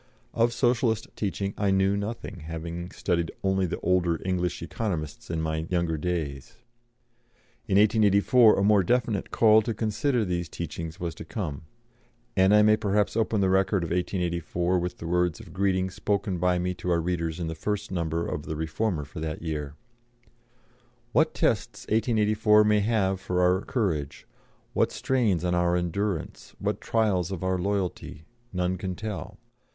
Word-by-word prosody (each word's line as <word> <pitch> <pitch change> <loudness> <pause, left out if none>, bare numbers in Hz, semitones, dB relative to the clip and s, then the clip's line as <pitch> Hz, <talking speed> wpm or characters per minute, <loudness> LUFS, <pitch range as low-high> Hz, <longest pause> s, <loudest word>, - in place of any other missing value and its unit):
Of 115 +1 +2
Socialist 120 -2 +1
teaching 100 -1 -2
I 100 -1 +2
knew 95 +1 +3
nothing, 100 -1 -5
having 85 +2 -6
studied 85 -3 -1
only 95 -1 +1
the - - -4
older 90 -3 +1
English 90 -2 -1
Economists 85 -10 -4
in 80 -1 -2
my 80 0 -2
younger 85 -2 0
days. 75 -5 -3 1.1
In 100 -3 +2
1884 105 +2 +5
a 100 - +2
more 105 0 +5
definite 110 0 0
call 110 -1 +5
to 110 +1 -3
consider 115 +3 0
299 90 -2 -1
these 85 -2 -6
teachings 80 0 -6
was 85 -2 -3
to - - -9
come, 80 -4 -5 0.7
and 95 +1 +4
I 105 0 +6
may 105 0 +5
perhaps 105 0 0
open 110 -2 +1
the 95 - +3
record 95 -1 +2
of 85 - -4
1884 90 0 0
with 90 +1 -4
the - - -8
words 90 -1 +1
of 80 - -12
greeting 95 -1 +1
spoken 100 -1 -1
by 90 0 +2
me 90 +1 -1
to 90 - -2
our 85 -1 +3
readers 85 -1 -2
in 85 - -2
the 80 - -3
first 105 +6 -3
number 85 -2 -1
of 75 - -4
the 80 - -3
Reformer 80 +1 -2
for 75 - -9
that 80 0 -4
year: 75 -3 -4 1.4
"What - - +2
tests - - 0
1884 110 -1 +3
may 105 0 +3
have 100 -3 +1
for 90 -2 -1
our 90 +1 +3
courage, 90 - -2 0.5
what - - +2
strains 110 -10 +1
on 90 - +1
our 85 0 +2
endurance, 90 0 -3
what - - -2
trials 100 -6 +1
of 95 -2 -4
our 95 0 0
loyalty, 95 -5 -3 0.3
none 90 0 -1
can 95 -1 -3
tell. 105 0 -6
95 Hz, 165 wpm, -27 LUFS, 85-105 Hz, 1.4 s, I